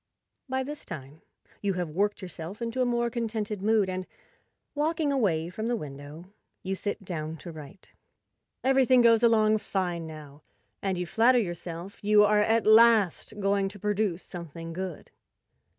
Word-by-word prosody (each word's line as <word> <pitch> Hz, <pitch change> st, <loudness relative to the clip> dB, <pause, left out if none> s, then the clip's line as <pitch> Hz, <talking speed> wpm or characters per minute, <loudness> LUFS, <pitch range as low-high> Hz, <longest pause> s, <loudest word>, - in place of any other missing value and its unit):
By 260 Hz, 0 st, 0 dB
this 295 Hz, +2 st, -7 dB
time 150 Hz, -1 st, -9 dB, 0.4 s
you 200 Hz, -1 st, 0 dB
have 175 Hz, -3 st, -3 dB
worked 205 Hz, +4 st, 0 dB
yourself 180 Hz, +2 st, -7 dB
into 235 Hz, +2 st, -2 dB
a 250 Hz, -, +2 dB
more 240 Hz, -1 st, 0 dB
contented 220 Hz, -3 st, -3 dB
mood, 215 Hz, -1 st, +3 dB
and, 185 Hz, 0 st, -4 dB, 0.7 s
walking 300 Hz, 0 st, 0 dB
away 175 Hz, -11 st, +1 dB
from 220 Hz, +4 st, -4 dB
the 240 Hz, -, +1 dB
window, 145 Hz, -2 st, -8 dB
rs8i 180 Hz, -, -21 dB, 0.3 s
you 190 Hz, -, -2 dB
sit 200 Hz, +1 st, -4 dB
down 160 Hz, -3 st, -4 dB
to 170 Hz, -, -9 dB
write. 160 Hz, +4 st, -12 dB, 0.7 s
Everything 260 Hz, -2 st, +4 dB
goes 230 Hz, -1 st, +5 dB
along 220 Hz, -2 st, +4 dB
fine 175 Hz, -5 st, -2 dB
now, 150 Hz, -2 st, -11 dB, 0.4 s
and 190 Hz, -2 st, -1 dB
you 180 Hz, -, -2 dB
flatter 230 Hz, +8 st, +4 dB
yourself 175 Hz, -2 st, -4 dB
you 210 Hz, 0 st, +6 dB
are 210 Hz, 0 st, +4 dB
at 225 Hz, +2 st, +2 dB
last 215 Hz, -3 st, +4 dB
going 195 Hz, 0 st, +1 dB
to 205 Hz, -, -11 dB
produce 205 Hz, -3 st, -1 dB
something 165 Hz, -1 st, -8 dB
good. 185 Hz, -2 st, -6 dB
200 Hz, 160 wpm, -28 LUFS, 170-225 Hz, 0.7 s, you